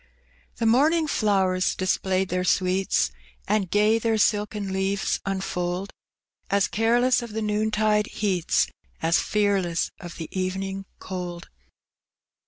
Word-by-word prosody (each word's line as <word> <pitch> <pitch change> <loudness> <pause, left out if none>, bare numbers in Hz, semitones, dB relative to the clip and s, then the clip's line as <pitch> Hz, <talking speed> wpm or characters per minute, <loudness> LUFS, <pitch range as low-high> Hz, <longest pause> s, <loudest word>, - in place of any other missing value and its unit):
The 230 - -2
morning 300 +8 +4
flowers 190 -8 +1
displayed 185 0 0
their 180 +1 0
sweets, 185 +1 +1 0.4
And 200 -2 +1
gay 210 +3 +3
their 225 -1 +1
silken 210 -2 0
leaves 195 +1 0
unfold. 190 -1 -2 0.6
As 200 0 +2
careless 240 +4 +2
of 235 -3 -8
the 220 - -2
noontide 210 0 +1
heats. 185 -5 +1 0.4
As 165 +1 +3
fearless 195 -5 0
of 175 -3 -9
the 160 - -5
evening 190 +1 -3
cold. 180 -2 -6
195 Hz, 115 wpm, -25 LUFS, 185-215 Hz, 0.6 s, morning